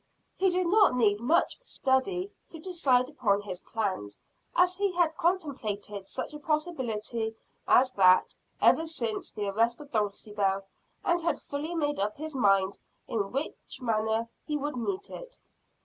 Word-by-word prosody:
He 380 0 +3
did 365 0 +1
not 395 -5 +5
need 210 -4 +3
much 315 - +1
study 360 - 0 0.2
to 330 - -9
decide 300 -8 +2
upon 220 -9 +1
his 185 -3 -6
plans, 190 - -3 0.4
as 360 0 +4
he 400 -1 +1
had 340 -3 +2
contemplated 215 - -2
such - - -5
a 300 - -7
possibility 240 -8 -2 0.3
as 255 +1 +5
that, 185 -4 +5 0.2
ever 325 - +4
since 235 -9 -2
the 205 -2 -4
arrest 230 +4 +1
of 290 -1 -12
Dulcibel, 205 -2 0 0.4
and 345 -1 +2
had 335 -2 0
fully 300 +4 -5
made 290 -5 0
up 205 +2 -1
his 310 +1 -5
mind 195 -5 +3 0.3
in 200 -3 -2
what 275 +4 -1 0.3
manner 220 -1 0 0.2
he 300 -1 -2
would 295 0 -3
meet 380 - -3
it. - - -9
255 Hz, 150 wpm, -29 LUFS, 210-330 Hz, 0.4 s, not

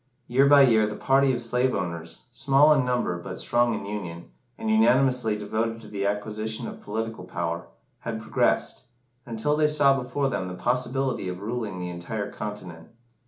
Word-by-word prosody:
Year 135 +4 +3
by 140 0 +8
year 110 -4 +4
the 105 - -5
party 135 +3 +3
of 120 - -2
slave 125 +2 0
owners 85 -3 -5
small 135 +5 +4
in 140 -3 +2
number 125 -8 -1
but 85 - -7
strong 120 -1 +1
in - - -5
union, 90 -5 -6 0.3
and 225 - -5
unanimously 130 - +3
devoted 110 +2 -2
to - - -12
the 100 -1 -2
acquisition 110 +2 -3
of - - -9
political 110 -1 -4
power 85 -2 -4 0.3
had 115 -1 -4
progressed, 110 - 0 0.4
until 120 +6 0
they 155 0 +3
saw 145 -2 +4
before 135 +3 -1
them 110 -8 -2
the 90 - -6
possibility 125 -1 -1
of 90 0 -5
ruling 110 -2 -4
the 90 0 -4
entire 100 +4 -5
continent. 95 -6 -7
110 Hz, 170 wpm, -26 LUFS, 100-130 Hz, 0.4 s, by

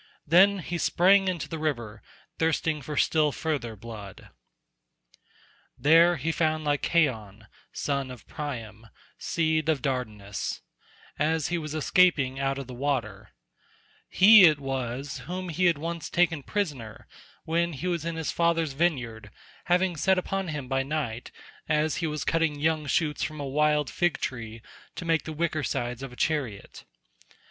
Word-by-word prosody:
Then 190 +6 +5
he 175 -1 -4
sprang 195 +4 +4
into 180 -3 -2
the 160 - -6
river, 120 -9 -3 0.4
thirsting 160 -1 0
for 145 +2 -6
still 155 0 +3
further 140 -8 -3
blood. 105 -3 -10 1.5
There 165 +4 +5
he 160 +2 -2
found 155 -1 0
Lycaon, 130 -8 0 0.3
son 140 -2 -2
of 125 -3 -10
Priam 115 -7 -7 0.3
seed 160 -1 0
of 150 -5 0
Dardanus, 110 -7 -3 0.6
as 155 0 +1
he 175 -1 -1
was 155 -1 -6
escaping 150 -5 +3
out 135 0 0
of 140 - -5
the 125 - -9
water; 120 -6 -3 0.8
he 205 +1 +8
it 155 -3 +4
was 135 0 -4
whom 185 0 -4
he 180 +3 0
had 170 -3 +4
once 165 +1 -5
taken 170 -3 +1
prisoner 140 - -4 0.4
when 170 +1 0
he 150 +5 -6
was 170 -3 -1
in 170 0 -3
his 160 -1 -2
father's 165 -3 +1
vineyard, 125 -9 -1 0.4
having 180 0 +2
set 190 +5 +2
upon 195 +1 -2
him 150 -5 -5
by 135 +1 0
night, 135 -5 -3 0.4
as 155 0 +1
he 165 - -1
was 150 -1 -3
cutting 165 -3 +1
young 155 0 0
shoots 150 0 0
from 155 -1 -3
a 145 - -4
wild 150 +1 +1
fig 175 +3 0
tree 115 -3 -5 0.3
to 180 - -6
make 165 -1 +1
the 160 - -5
wicker 155 0 -1
sides 120 -2 -3
of 135 -2 -7
a - - -12
chariot. 130 -10 -3
150 Hz, 155 wpm, -27 LUFS, 130-165 Hz, 1.5 s, he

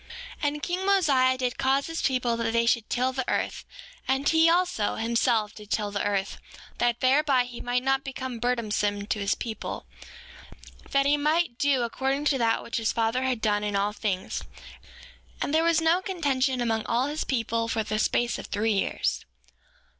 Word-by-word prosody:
6:7 290 - +1
And 295 0 -3
king 360 +1 -2
Mosiah 280 -10 +3
did 250 -1 -2
cause 270 +1 +2
his 330 0 -4
people 250 -3 +1
that 230 -1 -1
they 230 0 +2
should 230 -2 +1
till 255 +1 0
the 260 0 -1
earth. - - -2 0.4
And 265 +2 +1
he 325 +1 +5
also, 350 - +1
himself, 230 -1 +1
did 210 -1 -12
till 210 -1 -1
the 200 - -2
earth, 200 -1 -1 0.4
that 240 -1 +1
thereby 270 0 +3
he 245 -1 -9
might 245 +1 -1
not 270 0 +1
become 260 -3 -5
burdensome 210 -4 -1
to 210 - -2
his 200 0 +1
people, 225 -2 -5 1.0
that 275 0 +2
he 290 +1 +3
might 305 -3 0
do 275 -3 +2
according 270 +4 -1
to 280 -3 +2
that 225 -1 +1
which - - -4
his 225 -1 0
father 230 +2 0
had 255 -3 -1
done 210 -1 +1
in 205 -1 -2
all 200 +1 +1
things. 195 -4 -3 1.0
And 285 - -2
there 320 +1 +4
was 335 -1 +3
no 330 +3 +3
contention 275 -9 0
among 225 -2 0
all 240 +3 +1
his 300 +2 -2
people 230 -2 -1
for 225 -1 -1
the 215 0 -2
space 240 +2 +1
of - - -8
three 220 +1 0
years. 195 - -1
250 Hz, 185 wpm, -26 LUFS, 225-280 Hz, 1.0 s, he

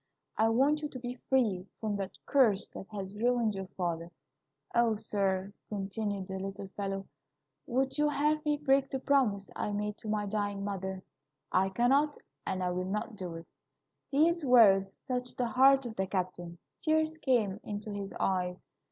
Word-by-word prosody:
I 220 +1 +3
want 275 +6 +3
you 300 - -3
to 260 - -7
be 245 0 -6
free 210 -8 +2
from 215 -2 -1
that 195 -1 -5
curse 225 -8 +3
that 195 - -9
has 195 -2 -6
ruined 235 0 +2
your 195 -1 -5
father,' 170 -2 -2 0.6
O, 235 -2 +3
sir," 195 -2 -1 0.2
continued 200 -1 -3
the 190 -1 -4
little 195 0 -6
fellow, 195 0 -4 0.6
"would 265 +4 0
you 295 0 +4
have 300 +1 +1
me 295 -1 +1
break 275 -2 +2
the 270 - -2
promise 255 -8 +1
I - - -2
made 210 0 -2
to - - -9
my 210 -1 0
dying 205 -1 -2
mother? 190 -1 -4 0.5
I 190 +1 +3
cannot, 270 +8 +3 0.3
and 185 -1 -1
I 180 - +1
will 180 +1 -2
not 210 +2 -3
do 180 -4 -6
it." 165 0 -8 0.6
These 325 +4 +3
words 200 -7 +6
touched 250 -1 -3
the 250 - +1
heart 270 +2 +5
of 230 -2 -5
the 190 -2 -1
captain. 180 -2 -3 0.2
Tears 315 0 +2
came 215 -7 +2
into 210 0 -5
his 200 -1 -5
eyes. 180 -1 0
210 Hz, 170 wpm, -31 LUFS, 195-260 Hz, 0.6 s, words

